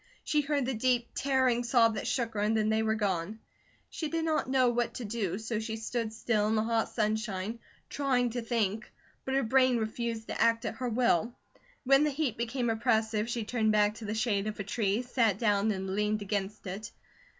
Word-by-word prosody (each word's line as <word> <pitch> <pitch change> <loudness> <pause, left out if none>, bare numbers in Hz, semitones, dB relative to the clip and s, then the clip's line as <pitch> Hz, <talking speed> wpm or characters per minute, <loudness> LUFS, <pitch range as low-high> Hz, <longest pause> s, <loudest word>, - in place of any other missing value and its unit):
She 300 - +1
heard 285 -2 0
the 265 - -1
deep, 240 +1 +1
tearing 260 -3 +2
sob 235 -1 +4
that 210 - -4
shook 235 -3 -1
her, 210 - -3
and 215 +2 +2
then 215 0 +1
they 220 0 +2
were 220 0 +1
gone. 200 -1 -1 0.5
She 315 - -3
did 325 +1 -2
not 310 -4 0
know 260 -1 +4
what 240 0 -1
to 245 - -5
do, 205 -4 -2
so 220 0 -3
she 220 0 -4
stood 225 0 -3
still 220 -1 0
in 220 - +1
the 215 - +2
hot 225 0 0
sunshine, 215 -1 -2 0.3
trying 255 -4 0
to 245 +1 -3
think; 220 -2 -1 0.3
but 265 - -1
her 275 - +2
brain 255 +1 +3
refused 225 0 -3
to - - -3
act 230 0 +3
at 225 - -4
her 255 -1 -2
will. 235 -2 +1 0.5
When 275 +2 +5
the 300 - +2
heat 280 -5 -1
became 240 +1 -1
oppressive, 220 -1 +1
she 235 -1 -2
turned 220 -1 +1
back 210 0 +3
to 225 - -8
the 210 +1 -3
shade 215 -3 0
of 215 - -5
a - - -1
tree, 205 +2 0
sat 235 -5 +1
down, 210 -1 +2
and 190 -2 -2
leaned 210 +1 0
against 205 +1 -3
it. 195 +3 -5
225 Hz, 210 wpm, -30 LUFS, 215-245 Hz, 0.5 s, When